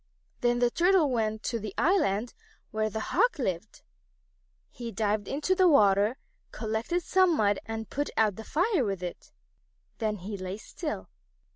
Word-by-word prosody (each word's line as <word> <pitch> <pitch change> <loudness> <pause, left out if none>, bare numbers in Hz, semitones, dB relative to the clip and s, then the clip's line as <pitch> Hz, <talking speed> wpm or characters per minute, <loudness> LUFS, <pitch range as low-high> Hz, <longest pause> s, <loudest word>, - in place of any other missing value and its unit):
Then 240 0 +2
the 240 0 +2
Turtle 345 -3 +3
went 220 -2 -1
to 235 - -2
the 210 -2 -6
island 245 - +2 0.4
where 215 0 0
the 220 - -4
Hawks 485 - +3
lived. 190 - -4 0.9
He 235 -2 -7
dived 210 -2 -1
into 300 +7 0
the 370 0 +4
water, 210 - +4 0.3
collected 225 +11 -2
some 370 -3 +3
mud, 205 -1 +2
and 225 -1 -4
put 290 +1 -2
out 215 -3 +3
the 220 - -8
fire 345 - +1
with 195 -4 -3
it. 175 - -7 0.7
Then 215 -2 0
he 200 +2 -6
lay 185 +1 -5
still. 300 - -6
225 Hz, 155 wpm, -28 LUFS, 205-295 Hz, 0.9 s, the